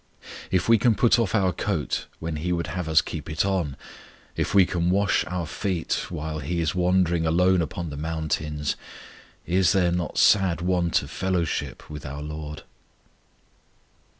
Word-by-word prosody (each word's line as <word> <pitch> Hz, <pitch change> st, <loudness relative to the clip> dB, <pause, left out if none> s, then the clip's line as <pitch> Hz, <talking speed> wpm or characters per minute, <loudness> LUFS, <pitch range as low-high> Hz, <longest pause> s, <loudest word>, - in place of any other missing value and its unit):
If 95 Hz, -1 st, +1 dB
we 115 Hz, -1 st, +6 dB
can 115 Hz, +1 st, +3 dB
put 120 Hz, +1 st, +4 dB
off 115 Hz, -2 st, 0 dB
our 95 Hz, -4 st, +2 dB
coat -, -, -2 dB
when 80 Hz, -1 st, -4 dB
He 90 Hz, +4 st, -2 dB
would 85 Hz, -1 st, 0 dB
have 90 Hz, -2 st, -3 dB
us 80 Hz, -1 st, +5 dB
keep 80 Hz, -2 st, -6 dB
it 75 Hz, +4 st, 0 dB
on; 90 Hz, -8 st, -1 dB, 0.6 s
if -, -, -1 dB
we 95 Hz, -2 st, +7 dB
can 85 Hz, -1 st, 0 dB
wash 100 Hz, +2 st, +2 dB
our 90 Hz, 0 st, -3 dB
feet 90 Hz, +2 st, -2 dB
while 80 Hz, -2 st, -4 dB
He 85 Hz, +5 st, -2 dB
is 80 Hz, -2 st, 0 dB
wandering 90 Hz, -2 st, +2 dB
alone 90 Hz, +2 st, +3 dB
upon 85 Hz, +1 st, -4 dB
the 70 Hz, -, -6 dB
mountains, 75 Hz, -1 st, -2 dB, 0.7 s
is 90 Hz, -1 st, +3 dB
there 90 Hz, -3 st, +3 dB
not 85 Hz, -2 st, -2 dB
sad 95 Hz, -6 st, +4 dB
want 90 Hz, -1 st, +1 dB
of -, -, -10 dB
fellowship 85 Hz, -7 st, -2 dB
with 75 Hz, -2 st, -8 dB
our 75 Hz, +1 st, -6 dB
LORD? 75 Hz, 0 st, -7 dB
85 Hz, 165 wpm, -25 LUFS, 75-95 Hz, 0.7 s, we